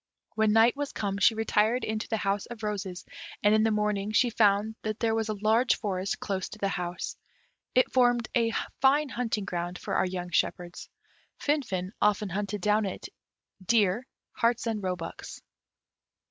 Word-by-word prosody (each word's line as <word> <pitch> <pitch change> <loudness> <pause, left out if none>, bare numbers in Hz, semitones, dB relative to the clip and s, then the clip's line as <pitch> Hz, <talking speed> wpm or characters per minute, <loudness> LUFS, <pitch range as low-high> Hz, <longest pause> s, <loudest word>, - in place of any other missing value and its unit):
When 220 -1 +2
night 225 +3 +5
was 285 0 -4
come, 200 -1 -2
she 220 +3 +5
retired 220 +2 +1
into 220 0 -2
the 225 - -1
house 200 -1 -1
of 235 -2 -9
roses, 195 -3 -4 0.4
and 205 0 +5
in 215 - +4
the 225 - +3
morning 210 -1 0
she 240 +2 +3
found 210 0 +3
that 215 0 -3
there 225 -1 +1
was 225 0 -1
a 215 - -1
large 220 +5 +3
forest 190 -2 -2
close 190 -2 -3
to - - -10
the 200 -2 -1
house. 180 -1 -4 0.6
It 255 - +4
formed 245 -2 +3
a 230 -2 +3 0.3
fine 280 +2 +4
hunting 230 -5 -2
ground 175 -1 -3
for - - -5
our - - +2
young 180 -1 -5
shepherds. 175 +1 -2 0.5
Finfin 195 -12 -1
often 210 -1 +2
hunted 200 +2 -3
down 210 +1 +2
in 190 - -3
it - - -9 0.5
deer, 220 +3 +2 0.2
harts, 235 0 +1
and 225 -2 -2
roebucks. 180 -3 -5
210 Hz, 175 wpm, -28 LUFS, 195-230 Hz, 0.6 s, night